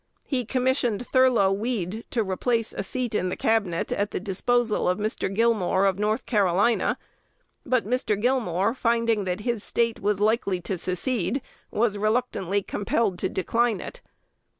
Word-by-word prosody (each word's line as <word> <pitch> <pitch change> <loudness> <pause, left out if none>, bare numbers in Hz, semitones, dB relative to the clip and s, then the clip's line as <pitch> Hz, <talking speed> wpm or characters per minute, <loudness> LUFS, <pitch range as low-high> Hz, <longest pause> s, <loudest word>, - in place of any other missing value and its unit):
He 255 -4 -2
commissioned 250 -2 0
Thurlow 250 -7 +4
Weed 215 0 -2
to 225 -3 0
place 230 -3 0
a - - -2
seat 245 +4 -3
in 185 -3 0
the - - -3
Cabinet 205 -7 0
at 205 0 0
the - - -3
disposal 215 +3 +1
of 180 - +1
Mr. 215 -2 -2
Gilmore 200 -3 +2
of 195 -1 +1
North 215 +3 0
Carolina; 205 +1 +2 0.7
but 255 -3 +2
Mr. 220 -3 0
Gilmore, 225 -5 +1
finding 230 -4 +1
that 180 +2 -2
his 235 -1 -2
State 230 -1 0
was 205 0 0
likely 210 -3 +1
to 190 - -3
secede, 185 +5 -1 0.3
was 210 -2 0
reluctantly 205 -3 0
compelled 205 -1 -1
to 190 - -1
decline 230 +3 0
it. - - -8
215 Hz, 150 wpm, -25 LUFS, 195-240 Hz, 0.7 s, Thurlow